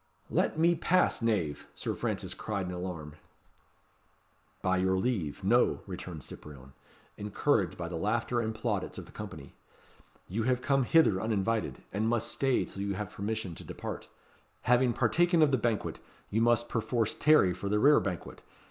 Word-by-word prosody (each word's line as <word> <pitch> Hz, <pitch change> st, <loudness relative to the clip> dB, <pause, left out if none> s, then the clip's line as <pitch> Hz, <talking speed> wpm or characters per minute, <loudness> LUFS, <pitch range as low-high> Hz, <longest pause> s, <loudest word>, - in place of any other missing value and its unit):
"Let -, -, +1 dB
me 170 Hz, +2 st, +4 dB
pass, 175 Hz, -1 st, +2 dB
knave," 100 Hz, -11 st, 0 dB
Sir -, -, -2 dB
Francis -, -, -3 dB
cried 100 Hz, -3 st, -3 dB
in 90 Hz, -, -4 dB
alarm. 90 Hz, -4 st, -6 dB, 1.5 s
"By 95 Hz, 0 st, +2 dB
your 95 Hz, 0 st, +2 dB
leave, 95 Hz, -, -1 dB
no," 120 Hz, +6 st, +3 dB
returned 90 Hz, -5 st, -7 dB
Cyprien, 65 Hz, -1 st, -11 dB, 0.4 s
encouraged 105 Hz, -, 0 dB
by 85 Hz, -1 st, -4 dB
the 85 Hz, -1 st, -4 dB
laughter 120 Hz, +6 st, 0 dB
and 110 Hz, -1 st, -3 dB
plaudits 110 Hz, -4 st, -2 dB
of -, -, -7 dB
the -, -, -15 dB
company. 95 Hz, -10 st, -8 dB, 0.7 s
"You 105 Hz, +6 st, -2 dB
have 125 Hz, +2 st, +1 dB
come 135 Hz, 0 st, +2 dB
hither 115 Hz, -11 st, +4 dB
uninvited, 110 Hz, 0 st, -1 dB
and 110 Hz, +3 st, +1 dB
must 120 Hz, 0 st, 0 dB
stay 135 Hz, -2 st, +1 dB
till 100 Hz, -, -8 dB
you 100 Hz, -1 st, -1 dB
have 105 Hz, 0 st, -4 dB
permission 105 Hz, -2 st, -3 dB
to -, -, -10 dB
depart. -, -, -6 dB, 0.5 s
Having 125 Hz, 0 st, +3 dB
partaken 175 Hz, +5 st, +3 dB
of 145 Hz, -, +4 dB
the 135 Hz, -, +3 dB
banquet, 115 Hz, -1 st, -1 dB, 0.3 s
you 110 Hz, -, +2 dB
must, 120 Hz, 0 st, +3 dB
perforce, 115 Hz, -1 st, 0 dB
tarry 150 Hz, -12 st, +5 dB
for 100 Hz, +2 st, -4 dB
the 105 Hz, -, +2 dB
rerebanquet. 105 Hz, -, +2 dB
105 Hz, 160 wpm, -30 LUFS, 95-120 Hz, 1.5 s, tarry